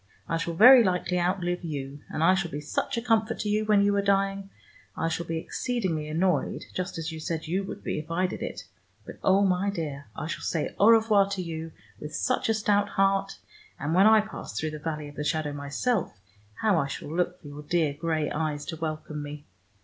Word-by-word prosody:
I 165 - 0
shall 165 0 -3
very 245 +6 +9
likely 180 -2 0
out 180 +2 0
live 175 +1 -2
you, 140 -3 -5
and 155 - -2
I 185 +3 +6
shall 190 -3 -1
be 145 - -5
such 150 +9 -2
a 230 - -2
comfort 225 -2 +1
to 210 - -2
you 215 +1 +1
when 210 -1 +4
you 200 0 +3
are - - +3
dying. 195 0 +1 0.5
I 165 - 0
shall 165 +1 -3
be 165 - -2
exceedingly 180 -5 -2
annoyed, 165 0 0
just 185 -1 -3
as 165 0 -3
you 160 - -7
said 160 +1 -3
you 185 +5 -1
would - - -8
be - - -2
if 155 +1 -9
I 175 +3 +1
did 180 - -4
it, - - -5 0.4
but, - - -10
oh, 195 +1 +4
my 185 +1 +1
dear, 150 -7 -4
I - - -4
shall 165 - -4
say 160 - -2
au 205 - +6
revoir 220 -3 +5
to 195 -2 -3
you 165 -1 -5 0.3
with 150 +1 -7
such 255 - 0
a 225 - +3
stout 205 -1 +2
heart, 195 0 +1 0.4
and 145 +2 -2
when 190 +4 +6
I 220 0 +7
pass 205 - -7
through 155 0 -2
the 155 - -7
valley 150 -1 -4
of 145 - -11
the 150 - -4
shadow 150 -1 -1
myself 145 - -1 0.4
how 210 -6 +3
I 140 - 0
shall 145 +3 -6
look 180 +1 0
for - - -13
your 145 +1 -8
dear 155 -1 +1
gray 155 0 -1
eyes 150 -2 -2
to 160 - -5
welcome 155 -1 -4
me. 145 0 -8
170 Hz, 225 wpm, -27 LUFS, 155-200 Hz, 0.5 s, very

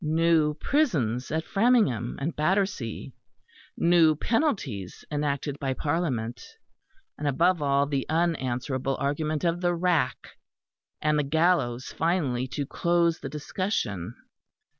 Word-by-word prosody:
New 160 -1 +2
prisons 145 - 0
at 160 +1 -2
Framingham 195 - +2
and 150 +4 -3
Battersea; 185 - -1 0.6
new 170 -2 +5
penalties 160 - -1
enacted 145 -1 -2
by 135 -1 -1
Parliament; 130 -8 -2 0.8
and, 150 - -2
above 170 +5 +2
all, 140 0 +2
the 140 -2 -2
unanswerable 135 -5 -1
argument 150 +3 -1
of 170 0 0
the 175 -1 +1
rack, 175 -2 -1 0.6
and 150 0 +2
the - - +2
gallows 145 -5 +1
finally 145 -7 0
to 135 +3 -3
close 170 +2 +1
the 135 - -6
discussion. 145 - -3
150 Hz, 115 wpm, -27 LUFS, 135-170 Hz, 0.8 s, new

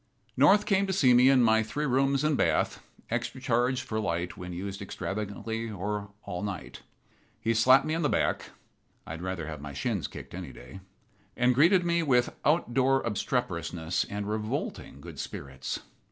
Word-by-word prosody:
North 205 +1 +5
came 195 -1 +2
to 190 - -1
see 130 -9 +5
me 125 +2 +6
in 130 -2 +5
my 110 -1 +4
three 145 +8 -3
rooms 135 +1 +2
and 155 -1 +2
bath, - - +1 0.3
extra - - -2
charge 125 0 +1
for 110 -4 -3
light 85 -4 -2
when 90 0 -7
used 95 +3 -5
extravagantly 105 +3 -4
or 105 0 -4
all 90 - -5
night. 100 -2 -6 0.6
He 115 - +1
slapped 130 +4 +5
me 155 - -1
on 165 - 0
the 150 - +2
back - - 0 0.6
(I - - -8
would 80 +1 -6
rather 95 -3 -3
have 75 -2 -6
my 70 0 -7
shins 100 - -2
kicked - - -10
any - - -6
day), 65 +9 -11 0.6
and 125 +1 +4
greeted 175 +7 +5
me 170 0 +2
with 125 -6 +2
out 150 -4 +2
door 135 +1 +3
obstreperousness 90 -7 -1
and 100 0 -4
revolting 105 0 -4
good - - -10
spirits. 65 -2 -5
115 Hz, 175 wpm, -28 LUFS, 95-135 Hz, 0.6 s, me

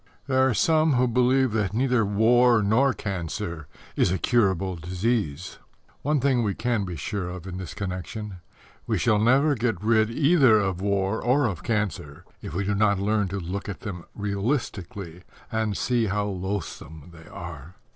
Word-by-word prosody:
There 130 0 +3
are 120 - 0
some 155 +1 +3
who 125 0 +3
believe 125 +1 +2
that 105 -2 -1
neither 125 -1 +2
war 115 +3 +4
nor 120 +7 +3
cancer 85 - -5 0.3
is - - +2
a 95 - +1
curable 95 -4 +1
disease. 90 -1 -2 0.4
One 150 +1 +1
thing 130 -2 +2
we 105 -4 -1
can 115 -3 -1
be 90 -2 -5
sure 90 +4 -4
of 90 -1 -8
in 90 -1 -6
this 90 -4 -7
connection: 100 +1 -5 0.5
we - - +1
shall 110 -3 +2
never 135 +7 +4
get 115 -7 -1
rid 110 0 +3
either 140 -2 +4
of 95 -3 -1
war 100 +1 0
or 130 +4 +2
of 95 -6 -2
cancer 100 -11 -3 0.2
if - - -7
we 100 - 0
do 105 - 0
not 100 0 +2
learn 105 +1 +1
to 95 +2 -4
look 95 +4 -5
at 100 - -6
them 90 -5 -6
realistically 100 - -3 0.3
and 110 -2 -1
see 120 -3 +1
how 100 +1 -1
loathsome 90 -5 -5
they 80 0 -14
are. 85 -1 -9
105 Hz, 170 wpm, -25 LUFS, 95-120 Hz, 0.5 s, war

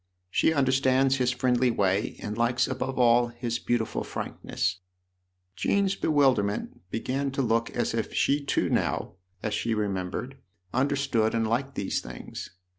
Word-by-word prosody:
" - - -48
She - - +3
understands 135 -1 +3
his 125 -1 +2
friendly 125 0 +2
way 100 -2 +1
and 105 0 -3
likes 120 +2 +2
above 135 0 -3
all 120 -1 +5
his 120 0 -3
beautiful 120 -2 -1
frankness." 90 - -3
THE - - -31
OTHER 90 0 -50
HOUSE - - -43
15 - - 0
Jean's 195 -1 +2
bewilderment 135 - +1
began 135 +6 -1
to 135 0 -1
look 115 0 +1
as 120 - -1
if 115 -1 -2
she 140 +1 +2
too - - +1
now, - - 0 0.3
as 105 - -1
she 110 +2 0
remembered, 105 +5 -3 0.4
understood 135 -4 +1
and 115 -1 +1
liked 130 +4 -1
these 95 - -1
things. - - -8
120 Hz, 165 wpm, -27 LUFS, 105-135 Hz, 0.4 s, all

